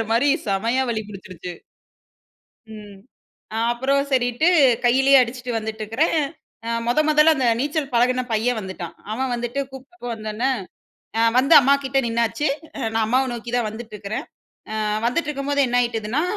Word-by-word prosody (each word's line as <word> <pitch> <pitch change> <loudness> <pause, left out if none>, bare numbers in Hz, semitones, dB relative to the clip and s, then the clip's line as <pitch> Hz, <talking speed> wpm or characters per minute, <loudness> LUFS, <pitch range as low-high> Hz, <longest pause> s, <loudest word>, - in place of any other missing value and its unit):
வலிக்குதுங்கிற 225 - 0
மாரி 255 +5 +3 0.2
செமையா 230 +7 +1
வலி 220 -1 -2
புடுச்சுடுச்சு. 185 -3 -9 1.2
ம். 205 -2 -11 0.7
அப்புறம் 270 +3 +1
சரின்ட்டு 245 +5 +2 0.4
கையிலயே 270 +3 +5
அடிச்சுட்டு 250 0 -2
வந்துட்டிருக்கிறேன். 220 +8 -1 0.5
அ - - -2 0.2
மொத, 245 +5 +2
மொதல்ல 305 +1 +5
அந்த 260 -2 +1
நீச்சல் 285 -1 -2
பழகுன 250 +2 +3
பையன் 225 +2 +1
வந்துட்டான். 185 -3 -7 0.2
அவன் 260 +2 -2
வந்துட்டு 240 +3 -3
கூப்பிட்டப்போ 265 +1 -10
வந்தோடனே, 220 +4 -2 0.9
வந்து 275 +5 +4
அம்மாகிட்டே 275 0 +2
நின்னாச்சு. 235 +6 0 0.3
அ - - -6
நான் 225 -1 +1
அம்மாவ 260 +3 +2
நோக்கி 235 0 -7
தான் 235 -3 0
வந்துட்ருக்கிறேன் 215 -2 -6 0.5
அ - - -3 0.3
வந்துட்ருக்கும்போது, 285 0 -1
என்னாயிட்டுதுன்னா, 240 +2 0
245 Hz, 130 wpm, -22 LUFS, 220-270 Hz, 1.2 s, கையிலயே